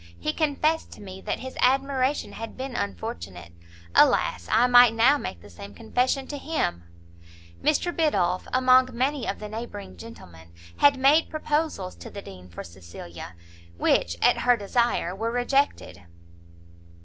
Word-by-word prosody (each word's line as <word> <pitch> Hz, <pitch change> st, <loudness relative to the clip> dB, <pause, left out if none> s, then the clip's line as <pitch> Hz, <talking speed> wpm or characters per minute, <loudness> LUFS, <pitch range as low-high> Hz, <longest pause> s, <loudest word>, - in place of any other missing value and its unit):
He 120 Hz, -, -2 dB
confessed 310 Hz, +1 st, 0 dB
to -, -, -15 dB
me, 190 Hz, -1 st, -10 dB
that -, -, -3 dB
his 260 Hz, 0 st, -8 dB
admiration 270 Hz, +1 st, +1 dB
had 225 Hz, 0 st, -8 dB
been 260 Hz, -1 st, -6 dB
unfortunate; 90 Hz, -2 st, -6 dB, 0.4 s
alas! 85 Hz, -1 st, +3 dB
I 235 Hz, -, +4 dB
might 245 Hz, -2 st, +6 dB
now 260 Hz, +6 st, +4 dB
make 85 Hz, -, -6 dB
the -, -, -14 dB
same 100 Hz, +4 st, -11 dB
confession 260 Hz, -, -1 dB
to 290 Hz, -, -5 dB
him!" 295 Hz, -, -2 dB, 0.8 s
Mr 325 Hz, +3 st, 0 dB
Biddulph, 185 Hz, -, 0 dB
among 255 Hz, 0 st, +4 dB
many 260 Hz, +1 st, -1 dB
of -, -, -2 dB
the 210 Hz, -, -7 dB
neighbouring 210 Hz, -2 st, -8 dB
gentlemen, 85 Hz, -, -13 dB, 0.2 s
had 285 Hz, -1 st, +5 dB
made 280 Hz, +5 st, +4 dB
proposals 300 Hz, -, -2 dB
to -, -, -10 dB
the 200 Hz, -, -9 dB
Dean 90 Hz, -1 st, -12 dB
for 85 Hz, -, -8 dB
Cecilia, 85 Hz, 0 st, -11 dB, 0.4 s
which, 85 Hz, 0 st, +1 dB
at -, -, +4 dB
her 245 Hz, -1 st, +3 dB
desire, 210 Hz, -3 st, 0 dB
were 225 Hz, +3 st, -2 dB
rejected. 245 Hz, -, -1 dB
240 Hz, 150 wpm, -25 LUFS, -, 0.8 s, might